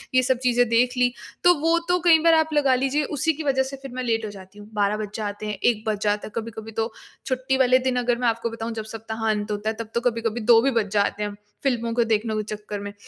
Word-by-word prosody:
ये 255 - +6
सब 255 0 +2
चीजें 245 -1 +3
देख 245 +2 +3
ली। 245 0 +3 0.3
तो 355 0 +7
वो 330 +2 +3
तो 360 0 +3
कई 325 -2 +7
बार 330 -1 +6
आप 315 -1 +2
लगा 275 -3 +3
लीजिए, 270 +3 0
उसी 305 +3 0
की 315 +2 -6
वज़ह 265 -2 +2
से 270 +1 -6
फिर 270 -2 -8
मैं 255 0 -4
लेट 225 -2 0
हो - - -4
जाती 195 +1 -13
हूँ। 205 - -11
12 205 0 +1
बज 210 -1 -4
जाते 210 -1 -4
हैं, 210 - -2
1 225 -3 +2
बज 210 -2 0
जाता 205 0 0
है - - -11
कभी-कभी 225 -1 -6
तो 225 +1 -2 0.3
छुट्टी 260 0 0
वाले 255 0 +4
दिन 260 -1 -1
अगर 240 -1 +1
मैं 245 -1 0
आपको 230 0 0
बताऊँ 230 0 -5
जब 220 -1 -4
सप्ताह 220 0 -4
अंत 210 0 -1
होता 210 +1 -2
है 220 - -3
तब 225 -1 -5
तो 235 - +1
कभी-कभी 230 -1 -1
2 230 +1 +6
भी 270 +2 +2
बज 220 -4 0
जाते 205 0 +1
हैं 205 0 -3 0.3
फ़िल्मों 235 -4 0
को 235 - +3
देखने 220 0 0
के 215 - -1
चक्कर 210 -1 -7
में। 205 0 -7
230 Hz, 270 wpm, -24 LUFS, 215-260 Hz, 0.3 s, तो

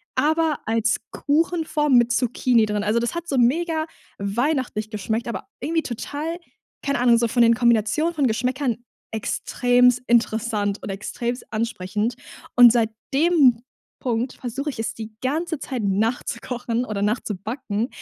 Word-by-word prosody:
aber 315 0 +2
als 225 0 +1
Kuchenform 310 -2 +1
mit 240 0 +4
Zucchini 240 -1 +2
drin. 210 -1 -2
Also 215 +2 +1
das 235 +5 -2
hat 340 0 -4
so 275 - -1
mega 315 +6 +2 0.3
weihnachtlich 225 +1 -1
geschmeckt, 220 +2 -3
aber 235 +2 -5
irgendwie 325 +1 0
total- 290 +7 -4 0.5
keine 280 -3 0
Ahnung- 240 -2 +5
so 235 - +2
von 240 +1 +3
den 230 0 +6
Kombinationen 240 +8 +2
von 285 -3 +2
Geschmäckern 250 +2 -1 0.4
extrem 245 +3 +2 0.2
interessant 220 -3 +1
und - - -5
extrem 235 +5 -3
ansprechend. 220 0 -2 0.4
Und 240 -1 +9
seit 225 -2 +2 0.2
dem 280 -6 +4 0.4
Punkt, 245 +1 -1
versuche 270 +4 -4
ich 255 - -7
es 225 - -2
die 220 -1 -8
ganze 315 +4 -1
Zeit 255 -3 -4
nachzukochen 230 +3 -1
oder 205 -3 -3
nachzubacken, 215 +1 -2
240 Hz, 140 wpm, -23 LUFS, 220-280 Hz, 0.5 s, Und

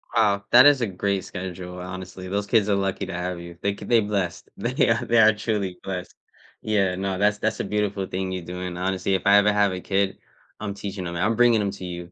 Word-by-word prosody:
Wow, 100 -3 +2
that 125 +2 +9
is 145 -3 +6
a 115 - +1
great 95 0 -2
schedule, 90 0 -7
honestly, 95 0 -7
those 100 +2 -2
kids 105 -2 +3
are 100 - +3
lucky 95 0 -1
to 95 - -7
have 90 0 -3
you. 85 0 -10
They 100 0 0
c - - -11
they 120 -1 +4
blessed. 100 -5 -2
They - - +1
ar - - +2
they 120 0 +3
are 110 0 +7
truly 105 -4 -2
blessed. 90 -2 -5 0.5
Yeah, 100 -4 +1
no, 95 0 -2
that's 105 +2 +2
that's 110 +1 -1
a - - 0
beautiful 105 -2 -1
thing 95 0 -3
you're 90 -2 -5
doing, 90 0 -5
honestly, 95 +1 -1
if 95 - -2
I 100 0 +7
ever 105 0 +5
have 100 -2 +2
a 90 - -5
kid, 95 0 0 0.4
I'm 100 -1 -4
teaching 100 -2 -6
'em 85 - -5
I'm 105 +6 +1
bringing 120 -2 +4
'em 100 -1 -1
to 95 -1 -8
you. 85 -1 -7
100 Hz, 240 wpm, -24 LUFS, 90-105 Hz, 0.5 s, that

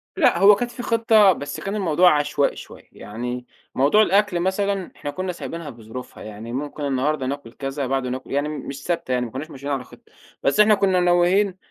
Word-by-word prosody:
لأ، 315 - +3
هو 200 +2 +8
كانت 240 +4 -3
في 245 +1 -7
خطة، 225 -4 +4
بس 145 -3 -6
كان 195 +1 -4
الموضوع 175 -4 +4
عشوائي 145 -1 0
شوية، - - -12
يعني 125 +3 -6 0.3
موضوع 145 +11 +4
الأكل 205 -3 +2
مثلًا 190 +1 -1
إحنا 145 - -5
كُنّا 185 +4 -3
سايبينها 165 -2 -7
بظروفها، 120 0 -10
يعني 110 +2 -8
ممكن 145 +3 -5
النهارده 140 +1 0
ناكُل 135 -3 -5
كذا، 135 0 -4
بعده 135 -1 -1
ناكُل 130 +1 -6
يعني 145 +2 0
مش 140 -2 -7
ثابتة 170 -6 -2
يعني، 125 -1 +1
ما 115 - -8
كُنّاش 145 +5 -6
ماشيين 140 0 -6
على 135 -2 -2
خطة، - - -19 0.3
بس 140 - +1
إحنا 210 0 +7
كُنّا 190 -2 +2
ناويين 180 +2 +3
150 Hz, 195 wpm, -22 LUFS, 135-195 Hz, 0.3 s, هو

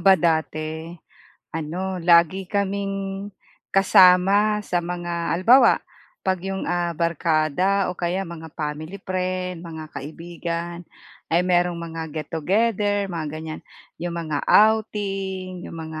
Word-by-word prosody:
ba 195 -1 +6
dati, 160 -1 -1 0.6
ano, 180 +4 -3
lagi 170 +2 +4
kaming 195 0 -2 0.4
kasama 195 +2 +5
sa 175 -1 0
mga 170 -1 -2
halimbawa 235 +9 +6 0.5
kapag 185 0 -1
iyong 190 - -3
ah, 175 0 0
barkada 170 +4 +1
o - - -17
kaya 180 +3 -1
mga 165 -1 -8
family 155 +5 -5
friend, 185 -1 -2
mga 160 -2 -7
kaibigan 170 +3 -5 0.5
ay 170 - +5
mayroong 175 -1 +2
mga 165 -1 -5
get 155 -1 -5
together, 205 +4 +1
mga 165 -2 -3
ganyan. 155 0 -6 0.4
Iyong 170 0 -3
mga 155 -3 -2
outing, 195 -4 +2
iyong - - -8
mga 160 -1 -6
175 Hz, 120 wpm, -23 LUFS, 165-195 Hz, 0.6 s, ba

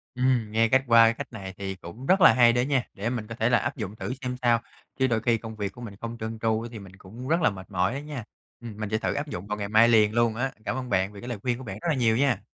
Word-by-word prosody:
Ừm, 125 -4 +1
nghe 115 +1 +3
cách 130 +3 +4
qua 115 -1 +7
cái 115 - +2
cách 115 - -8
này 95 -4 -7
thì 95 -1 -4
cũng 95 +8 -10
rất 190 +5 +3
là 165 - +8
hay 120 -2 +5
đó 120 - +2
nha, 135 -1 +1
để 105 +4 -3
mình 115 -4 -4
có 115 - -7
thể 115 +1 +1
là 125 - +5
áp - - -3
dụng 100 - -5
thử 125 - -4
xem 125 -1 -3
sao, 120 -2 +3 0.4
chứ 130 - +3
đôi 115 -3 0
khi 115 -2 +2
công 110 0 -8
việc 100 -2 -3
của 120 - -12
mình 110 -4 -8
không 115 0 -5
trơn 110 0 -5
tru 110 0 +1
á 120 - -6
thì 110 - -8
mình 95 -2 -12
cũng 115 +8 -10
rất 165 +4 +2
là 160 - +4
mệt 95 -1 -10
mỏi 95 +4 +1
á 135 - -3
nha. 145 -5 -6 0.4
Ừm, 115 -4 -9
mình 110 -1 -3
sẽ 110 - +1
thử - - -1
áp 145 +2 -3
dụng 100 -7 -6
vào 105 - -3
ngày 100 -1 -3
mai 110 +2 +6
liền 110 -2 +4
luôn 115 -1 +2
á. 130 +3 -1
Cảm - - -1
ơn 130 -1 -5
bạn 95 -2 +1
vì 100 - -10
cái 120 - -8
lời 120 -4 -4
khuyên 120 0 -1
của 130 - -9
bạn 100 -5 -6
rất - - -4
là 155 - +2
nhiều 115 -3 +2
nha. 135 -2 +1
115 Hz, 330 wpm, -26 LUFS, 105-125 Hz, 0.4 s, là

